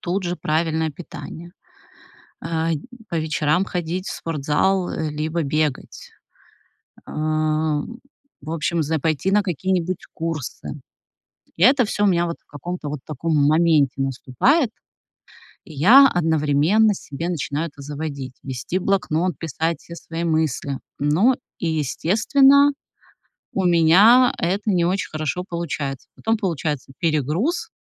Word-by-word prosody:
Тут 185 +2 -2
же 175 0 -2
правильное 160 0 0
питание. 170 +2 -10 0.9
Э, 165 0 -1 0.4
по 170 - -3
вечерам 155 +3 +1
ходить 180 +1 -3
в - - -3
спортзал 165 +5 0
либо 155 +2 -2
бегать. 150 -1 -2 1.0
Ам, 155 +5 -1 0.4
в 150 - -7
общем, 165 +1 0
за 160 +2 -1
пойти 155 +4 0
на 210 +1 +4
какие-нибудь 185 0 -2
курсы. 155 -2 -5 0.8
И 175 - +2
это 255 -1 +6
всё 205 0 0
у - - +5
меня 175 -2 +2
вот 170 - -4
в - - -45
каком-то 155 +3 -6
вот 145 -1 -4
таком 155 +2 -2
моменте 155 -4 +3
наступает. 135 - +1 0.9
И 160 - -12
я 230 - +7
одновременно 160 - +2
себе 165 -2 -6
начинаю 160 -1 -2
это 140 - -14
заводить, 140 -2 -6
вести 130 +7 -3
блокнот, 180 -4 0
писать 165 +1 -2
все 170 - -10
свои 165 0 -6
мысли. 155 -4 -1 0.2
Но 165 - +3 0.2
и, 170 - -2
естественно, 270 - +4 0.8
у 190 - 0
меня 185 +9 +6
это 195 +5 0
не 175 -3 +2
очень 185 0 -1
хорошо 155 +3 -3
получается. 145 -5 -4
Потом 225 0 0
получается 155 - -3
перегруз 165 - 0
165 Hz, 125 wpm, -22 LUFS, 150-185 Hz, 1.0 s, я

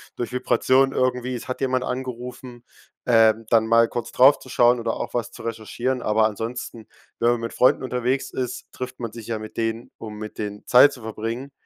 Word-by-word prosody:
durch 120 - -4
Vibration 130 +1 +2
irgendwie, 125 0 0
es 125 +3 -8
hat 130 - -3
jemand 130 -1 0
angerufen, 125 -1 -6 0.4
ähm, 115 -2 +4
dann 110 -1 +4
mal 115 0 +4
kurz 120 -1 -5
drauf 135 +3 +6
zu - - -14
schauen 120 -1 +3
oder 115 -1 -2
auch - - -5
was 120 -1 -2
zu - - -11
recherchieren, 120 +3 -3
aber 110 +1 +2
ansonsten, 115 +1 -6 0.3
wenn 120 +1 +3
man 120 - 0
mit 115 - -5
Freunden 125 - +3
unterwegs 130 +2 -1
ist, 125 -2 -5
trifft 125 0 -7
man 115 - -4
sich 115 -1 -10
ja 115 -1 -2
mit 110 0 -10
denen, 115 +1 -2
um 105 -1 -8
mit 110 0 -8
denen 105 -1 -6
Zeit 135 +3 +7
zu 125 - -11
verbringen. 115 +5 -5
120 Hz, 200 wpm, -23 LUFS, 115-125 Hz, 0.4 s, Zeit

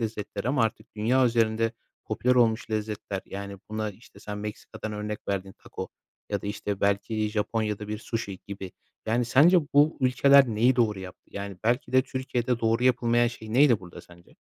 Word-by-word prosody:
lezzetleri 105 0 -3
ama 130 -3 +2
artık 110 0 -3
dünya 125 +5 +3
üzerinde 115 -1 +1 0.3
popüler 125 +1 +1
olmuş 115 -2 +2
lezzetler, 105 -2 -3
yani, 100 0 -6
buna 110 0 -2
işte 105 +4 -17
sen 105 0 -6
Meksika'dan 105 +1 -6
örnek 105 0 -5
verdin, 95 -1 -2
taco - - -7 0.4
ya 100 -1 -1
da, - - -5
işte, 105 -1 -3
belki 105 +2 0
Japonya'da 105 -1 -2
bir 105 0 -3
sushi 110 -4 -4
gibi. 95 -2 -7 0.3
Yani, 120 +2 +1
sence 155 +10 +6 0.2
bu 150 +2 +5
ülkeler 135 +1 +6
neyi 120 +3 +2
doğru 110 -5 +2
yaptı? 95 -1 -11
Yani, 100 -1 -6
belki 120 +3 0
de 130 0 +5
Türkiye'de 125 -2 -2
doğru 115 +2 +1
yapılmayan 120 -1 +3
şey 110 -2 -6
neydi 125 -4 +5
burada 90 -2 -11
sence? 85 -1 -19
110 Hz, 170 wpm, -27 LUFS, 105-120 Hz, 0.4 s, sence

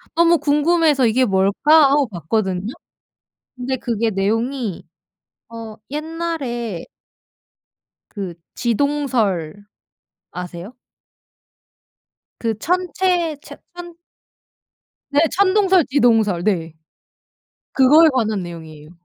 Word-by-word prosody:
너무 340 0 +4
궁금해서 295 -1 +2
'이게 250 +4 +2
뭘까?' 235 +10 +4
하고 285 -1 +2
봤거든요. 190 +2 -3 0.8
근데 255 +1 -3
그게 230 -2 -1
내용이 225 +2 -2 0.6
어 225 -1 -9
옛날에 295 - -4 1.3
그 195 -5 -5 0.2
지동설 230 - -1 0.7
아세요? 180 +5 -8 1.7
그 225 -2 -2
천체 360 +2 0
체 - - -12 0.2
천 345 -1 -10 1.2
네, 285 - +4 0.2
천동설 385 -2 +3
지동설. 225 -9 +2
네. 165 -6 -1 1.0
그거에 295 +5 +6
관한 220 -6 -1
내용이에요. 160 -3 -10
240 Hz, 180 characters per minute, -19 LUFS, 200-300 Hz, 1.7 s, 그거에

